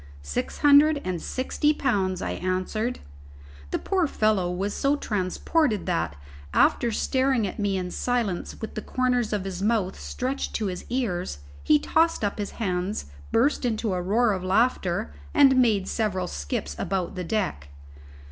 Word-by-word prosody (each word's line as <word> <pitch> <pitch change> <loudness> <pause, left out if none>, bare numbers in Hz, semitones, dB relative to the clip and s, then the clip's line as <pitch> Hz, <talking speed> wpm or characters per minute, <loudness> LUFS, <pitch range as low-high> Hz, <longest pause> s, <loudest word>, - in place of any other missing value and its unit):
"Six 70 0 -3
hundred 290 +1 +6
and 180 -3 -2
sixty 295 +3 0
pounds," 195 -10 0
I - - -2
answered. 185 +6 -2 0.7
The - - 0
poor 370 -4 0
fellow 215 -8 +1
was 195 +3 -2
so 280 +1 +2
transported 215 - 0
that, 80 -2 -1 0.4
after 240 - +4
staring 260 0 +1
at 195 - -5
me 200 -2 0
in 180 -1 -3
silence 235 -7 -2
with 220 - -5
the 215 - -4
corners 250 -1 0
of 205 -3 -1
his 190 -1 -4
mouth 205 -3 0
stretched 260 +2 -3
to 220 - -1
his 185 -2 -4
ears, 185 - -2 0.3
he 150 - +5
tossed 325 - +2
up 205 +1 -1
his 205 - -2
hands, 185 - -2 0.2
burst 270 +6 +2
into 220 -4 0
a 180 - -1
roar 215 +5 +2
of 185 -2 -4
laughter, 185 - +1 0.2
and 265 -2 +6
made 210 -6 +2
several 195 -5 -1
skips 70 - -4
about 185 -1 -2
the 185 - -4
deck. 180 - -2
205 Hz, 155 wpm, -26 LUFS, 185-245 Hz, 0.7 s, hundred